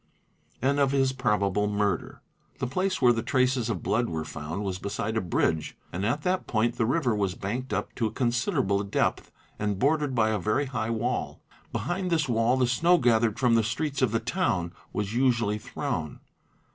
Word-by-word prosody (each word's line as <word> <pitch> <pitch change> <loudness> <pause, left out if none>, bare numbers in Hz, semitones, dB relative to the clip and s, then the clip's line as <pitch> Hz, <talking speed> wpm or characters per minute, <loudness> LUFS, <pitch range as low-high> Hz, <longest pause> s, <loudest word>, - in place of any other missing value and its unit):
and 140 +2 +2
of 140 -1 +3
his 135 -1 +2
probable 105 -5 +1
murder. 105 -1 -1 0.3
The 130 - -2
place 180 +3 -1
where 120 -1 +7
the 115 - -1
traces 130 -2 +1
of 100 -7 -3
blood 120 +2 +1
were 80 -1 -3
found 80 +5 -5
was 95 -2 -3
beside 100 +3 -3
a 110 - +1
bridge 80 -3 0 0.2
and 90 +3 -3
at 120 +8 0
that 185 0 0
point 115 +1 +1
the 110 - +1
river 130 -3 +1
was 100 -3 -1
banked 125 +7 -4
up - - -2
to 115 - +1
a - - -5
consider 120 -1 0
able 100 +1 +1
depth 100 - -1 0.3
and 105 -2 -1
bordered 145 +2 +1
by 110 -2 +3
a 110 - 0
very 110 +10 +1
high 120 -4 -3
wall. 115 +2 -2 0.3
Behind 180 +1 -2
this 160 -4 +1
wall 120 +1 +2
the 130 - +3
snow 165 +9 +4
gathered 115 -5 +2
from 120 -1 +3
the 115 - +5
streets 135 +5 -2
of 130 -5 +3
the 115 - +1
town 110 - -1 0.2
was 105 0 -3
usually 120 -4 +2
thrown. - - -4
120 Hz, 195 wpm, -27 LUFS, 105-130 Hz, 0.3 s, where